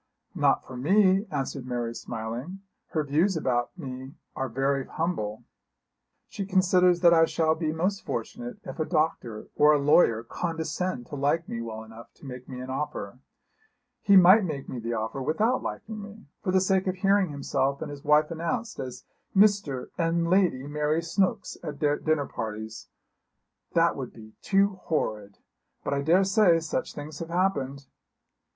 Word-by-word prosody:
'Not - - +2
for 130 - -9
me,' 190 - +3
answered 135 -3 -3
Mary 120 -2 -2
smiling. 120 +12 -6 0.3
'Her 155 - -1
views 160 +6 +1
about 125 +1 -1
me 130 -2 -7 0.2
are 135 0 -2
very 135 +2 0
humble. 135 -11 -3 0.8
She 200 - -5
considers 180 -2 +3
that 170 -1 +7
I 165 -1 +6
shall 160 -1 +1
be 160 -1 -2
most 185 +5 -1
fortunate 245 -2 -5
if - - -8
a 155 - +1
doctor 155 -10 -1
or 150 +1 +6
a - - +4
lawyer 140 -6 +4
condescend 165 0 -3
to 145 - -8
like 145 +4 0
me 115 - -4
well 110 -1 -6
enough 110 +1 -13
to - - -16
make 125 -1 -9
me 130 -1 -6
an 130 +1 -6
offer. 130 -5 -4 0.8
He 200 - +5
might 190 +3 +8
make 150 -6 -4
me 125 - -5
the 115 +1 -3
offer 110 +4 -3
without 215 - +1
liking 215 -1 -6
me, 210 +1 -11 0.2
for 185 - -1
the 190 0 +4
sake 190 0 +1
of 185 - 0
hearing 195 0 +2
himself 140 -1 -1
and - - -5
his 145 0 -9
wife 150 +1 +4
announced 170 +7 -3
as 130 -1 -6 0.3
Mr. 195 -10 +3
and 170 0 +1
Lady 180 -9 +3
Mary 150 +2 0
Snooks 185 +3 0
at 150 -3 -5
dinner 145 0 +1
parties. 110 -1 -6 0.9
That - - +4
would - - -6
be 110 -1 -13
too 195 -1 +2
horrid! 105 -10 -2 0.5
But - - -1
I 140 - 0
daresay 185 +3 +4
such 160 -1 -3
things 150 +1 -7
have 165 - -6
happened.' 145 -7 -1
155 Hz, 165 wpm, -27 LUFS, 130-185 Hz, 0.9 s, might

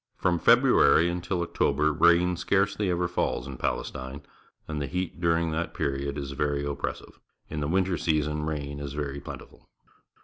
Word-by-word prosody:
From 85 -1 +1
February 85 0 +5
until 90 0 -2
October 75 -2 +1
rain 85 +3 +4
scarcely 95 +2 +1
ever 90 0 +1
falls 85 -7 -1
in 70 -2 -7
Palestine, 65 +2 -4 0.4
and 75 -2 -3
the 70 - -2
heat 90 0 -4
during 85 -1 +2
that 80 +1 -3
period 70 +1 -2
is 70 -1 -4
very 70 0 -1
oppressive. 70 -1 -5 0.3
In 75 - -3
the 75 - -1
winter 95 +1 +1
season 75 -1 0
rain 70 -2 -4
is 70 -1 -5
very 70 -1 -4
plentiful. - - -11
75 Hz, 160 wpm, -27 LUFS, 70-85 Hz, 0.4 s, February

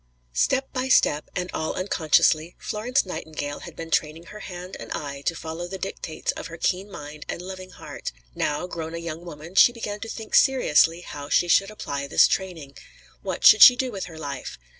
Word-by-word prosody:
Step 265 - +1
by 255 -1 -1
step, 150 - +3
and 180 0 -3
all 155 - -2
unconsciously, 160 -2 +2
Florence 245 +5 -1
Nightingale 155 -5 -5
had - - -10
been 165 0 -8
training 155 +2 0
her 210 +5 -11
hand 180 -1 -8
and - - -9
eye 140 -1 -5
to 165 - +1
follow 165 +2 -6
the 190 +2 -6
dictates 185 -4 -4
of - - -7
her 170 -1 -9
keen 185 +4 -1
mind 150 -4 -9
and - - -3
loving 185 +1 -8
heart. - - -8 0.2
Now, 150 - -1
grown 165 -2 -6
a - - -3
young 170 0 -6
woman, 165 0 -10
she 220 - +7
began 210 -3 -5
to 225 - -7
think 220 -1 -8
seriously 175 - +4
how 145 -4 -8
she 175 - +3
should 195 +4 +4
apply 140 -9 -5
this - - +6
training. 165 -8 -4 0.4
What - - -3
should - - +9
she 250 - +11
do 255 0 -2
with 195 -3 -5
her 165 -2 -11
life? 140 -4 -6
170 Hz, 200 wpm, -24 LUFS, 155-195 Hz, 0.4 s, she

